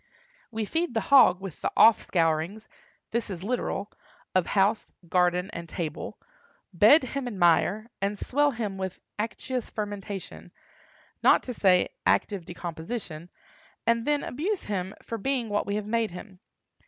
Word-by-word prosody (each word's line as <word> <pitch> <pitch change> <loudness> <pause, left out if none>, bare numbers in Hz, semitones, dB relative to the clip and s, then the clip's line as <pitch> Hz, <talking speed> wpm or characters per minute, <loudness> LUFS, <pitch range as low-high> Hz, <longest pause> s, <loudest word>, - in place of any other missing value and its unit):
We 220 -2 -3
feed 325 +2 -2
the - - +3
hog 185 -10 +7
with 190 -5 -8
the - - -1
offscourings 175 -1 +3 0.4
(this 235 -1 -1
is 180 -3 -6
literal) 210 -2 -2 0.4
of 185 -2 +2
house, 205 +2 +2 0.2
garden, 180 +2 +2
and 170 0 -7
table; 155 -3 -5 0.6
bed 215 - +7
him 255 0 -4
in 220 -5 -5
mire, 180 +4 +3 0.2
and 200 +1 -1
swell 290 +7 +2
him 215 -7 -4
with 190 -1 -4 0.2
acetous 245 +3 -3
fermentation, 205 -2 -6 0.7
not - - +5
to 250 - -5
say 185 -5 +3
active 195 -5 +1
decomposition, 170 0 -6 0.6
and 230 0 +2
then 295 -1 +1
abuse 360 +10 -2
him 190 -2 -3
for 230 - -5
being 255 -1 -1
what 205 0 -1
we 200 - -1
have 210 -1 -2
made 225 0 0
him. 185 +1 -11
205 Hz, 145 wpm, -27 LUFS, 180-230 Hz, 0.7 s, hog